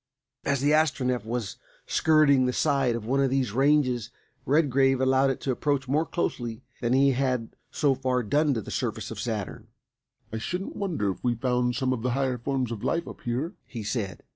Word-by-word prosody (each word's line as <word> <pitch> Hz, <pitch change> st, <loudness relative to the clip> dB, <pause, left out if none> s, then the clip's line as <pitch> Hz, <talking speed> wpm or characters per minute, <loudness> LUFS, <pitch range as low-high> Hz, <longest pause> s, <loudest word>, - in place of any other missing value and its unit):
As 140 Hz, -2 st, 0 dB
the 145 Hz, +1 st, +3 dB
Astronef 130 Hz, -6 st, +1 dB
was 115 Hz, -3 st, -3 dB, 0.3 s
skirting 150 Hz, -5 st, +4 dB
the 125 Hz, -, 0 dB
side 135 Hz, -5 st, +2 dB
of 115 Hz, -2 st, -5 dB
one 135 Hz, +4 st, +1 dB
of 135 Hz, -1 st, +3 dB
these 130 Hz, -4 st, 0 dB
ranges 130 Hz, -2 st, +2 dB, 0.4 s
Redgrave 135 Hz, -2 st, +3 dB
allowed 130 Hz, +1 st, +3 dB
it 135 Hz, -, -2 dB
to 135 Hz, -, -1 dB
approach 135 Hz, +1 st, -1 dB
more 150 Hz, +5 st, +1 dB
closely 120 Hz, -9 st, -3 dB, 0.2 s
than 120 Hz, +1 st, +1 dB
he 135 Hz, +1 st, +5 dB
had 125 Hz, -3 st, -1 dB
so 145 Hz, -3 st, +2 dB
far 130 Hz, -1 st, 0 dB
done 145 Hz, +5 st, +2 dB
to 115 Hz, -, -1 dB
the -, -, -9 dB
surface -, -, -3 dB
of -, -, -6 dB
Saturn. -, -, -4 dB, 0.7 s
"I 110 Hz, -, -2 dB
shouldn't 180 Hz, -, -4 dB
wonder 160 Hz, -, -1 dB
if -, -, -10 dB
we 120 Hz, -1 st, +1 dB
found 125 Hz, 0 st, 0 dB
some 130 Hz, -2 st, 0 dB
of 120 Hz, -, -4 dB
the 125 Hz, +1 st, 0 dB
higher 130 Hz, -2 st, 0 dB
forms 130 Hz, -1 st, -1 dB
of 110 Hz, -3 st, -5 dB
life 170 Hz, 0 st, 0 dB
up -, -, -9 dB
here," 130 Hz, -, -2 dB
he 115 Hz, -4 st, -6 dB
said. 105 Hz, -4 st, -3 dB
130 Hz, 195 wpm, -27 LUFS, 120-140 Hz, 0.7 s, he